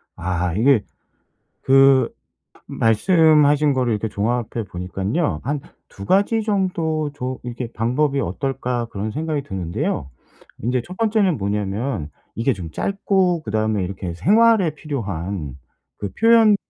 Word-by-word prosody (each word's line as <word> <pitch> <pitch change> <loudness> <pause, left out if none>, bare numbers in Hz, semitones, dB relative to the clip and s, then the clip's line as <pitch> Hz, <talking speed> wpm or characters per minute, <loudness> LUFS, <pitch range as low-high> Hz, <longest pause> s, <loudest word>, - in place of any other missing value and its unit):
아. 90 -1 -2
이게 115 +3 +3 0.8
그 135 -2 +5 0.5
말씀하신 150 - +4
거를 125 -3 0
이렇게 110 +1 -2
종합해 115 +2 -2
보니깐요. 95 - -2
한 145 +3 -2 0.3
'2 100 - -10
가지 200 - +2
정도 170 -7 -1
조 130 -2 -5
이렇게 120 -1 -6
방법이 135 +5 0
어떨까.' 125 +3 -2
그런 105 -1 -4
생각이 155 +3 -2
드는데요. 90 - -3 0.5
인제 125 +2 0
1 180 - -10
번째는 210 -6 +2
뭐냐면 100 - -2 0.2
이게 120 +4 +1
좀 90 -8 -7
짧고 190 - 0
그다음에 110 -2 0
이렇게 90 -2 -5
생활에 210 - +4
필요한 95 - -4 0.4
그 100 - -5
표현 225 -2 +6
125 Hz, 260 characters per minute, -21 LUFS, 100-160 Hz, 0.8 s, 표현